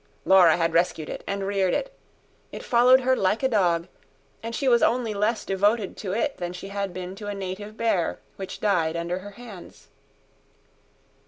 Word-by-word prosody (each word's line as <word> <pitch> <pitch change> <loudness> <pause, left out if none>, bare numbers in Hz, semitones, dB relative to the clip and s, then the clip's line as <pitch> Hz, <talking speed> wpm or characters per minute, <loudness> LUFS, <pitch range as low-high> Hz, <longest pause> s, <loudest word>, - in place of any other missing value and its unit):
Laura 180 -4 +6
had 165 -1 0
rescued 165 -2 +1
it - - -6
and 200 0 -2
reared 195 -2 +1
it; - - -3 0.6
it - - -8
followed 250 +2 +5
her 260 +1 +2
like 205 +3 0
a - - +4
dog; 175 -7 +1 0.5
and 230 +1 -5
she 275 - -1
was 240 -2 +5
only 230 -2 +1
less 210 +2 -1
devoted 205 +2 +1
to 195 - -5
it 230 +7 -1
than 175 -1 -4
she 180 +2 -8
had 200 -1 -3
been 180 +1 -6
to 205 +1 -9
a 205 - -3
native 195 +3 -6
bear 195 -7 0 0.2
which 190 -1 -7
died 170 -6 +1
under 170 +2 -2
her 200 +2 -9
hands. 220 -7 -12
200 Hz, 180 wpm, -25 LUFS, 180-225 Hz, 0.6 s, Laura